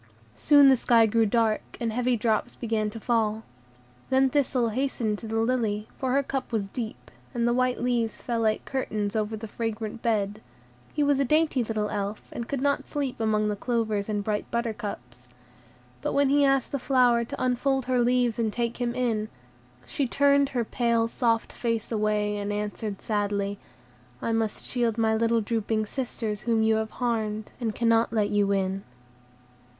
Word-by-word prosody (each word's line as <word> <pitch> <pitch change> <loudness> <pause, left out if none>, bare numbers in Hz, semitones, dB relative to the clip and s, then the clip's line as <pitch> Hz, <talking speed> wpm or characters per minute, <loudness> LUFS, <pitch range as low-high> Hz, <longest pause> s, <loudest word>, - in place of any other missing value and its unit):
Soon 285 -2 +6
the 265 - +7
sky 235 -2 +4
grew 225 0 +2
dark, 225 0 0
and 230 -2 -1
heavy 250 +1 +1
drops 220 0 0
began 220 -2 -1
to 225 - -8
fall. 220 -2 0 0.7
Then 265 0 +3
Thistle 260 -4 +1
hastened 225 -3 -1
to 225 - -8
the 225 +1 -2
lily, 225 -3 0
for 260 -2 0
her 280 +1 +3
cup 270 -1 -4
was 215 -4 -1
deep, 225 +2 -6 0.2
and 235 0 +1
the 240 - +3
white 255 0 +1
leaves 235 -3 0
fell 235 -2 -3
like 220 -1 +1
curtains 215 -6 -2
over 220 0 -1
the 220 +1 -7
fragrant 225 0 -4
bed; 210 -2 0 0.5
he 300 - 0
was 285 -1 +3
a - - +4
dainty 300 -1 +2
little 215 -2 -1
Elf, 205 +1 -4
and 235 - -5
could 275 -2 -2
not 280 0 0
sleep 280 -5 -3
among 215 -1 +1
the 210 - 0
clovers 220 -2 -1
and 205 -1 -1
bright 210 0 -2
buttercups. 205 - -4 0.7
But - - -2
when 280 -1 +3
he 285 +1 +4
asked 270 -1 +2
the 280 - -1
flower 245 -3 +3
to 235 - -7
unfold 255 +1 +1
her 255 -1 +1
leaves 245 -1 +2
and 225 -2 +1
take 235 +2 -2
him 240 0 -1
in, 225 -4 0 0.6
she 275 - -1
turned 280 +1 +3
her 245 -4 -1
pale, 235 -1 +1
soft 230 -1 0
face 230 -2 -2
away, 210 -1 0
and 205 0 -3
answered 210 0 -4
sadly, 205 -1 -1 0.6
"I 230 - -2
must 225 -2 -1
shield 235 -3 0
my 220 -1 +2
little 230 +1 +2
drooping 220 0 -1
sisters 220 -3 -4
whom 225 -1 +1
you 220 0 +3
have 220 0 -2
harmed, 220 -3 -2
and 225 -3 -2
cannot 230 -1 +3
let 215 -3 +1
you 205 -1 +2
in." 195 0 0
230 Hz, 180 wpm, -26 LUFS, 215-250 Hz, 0.7 s, the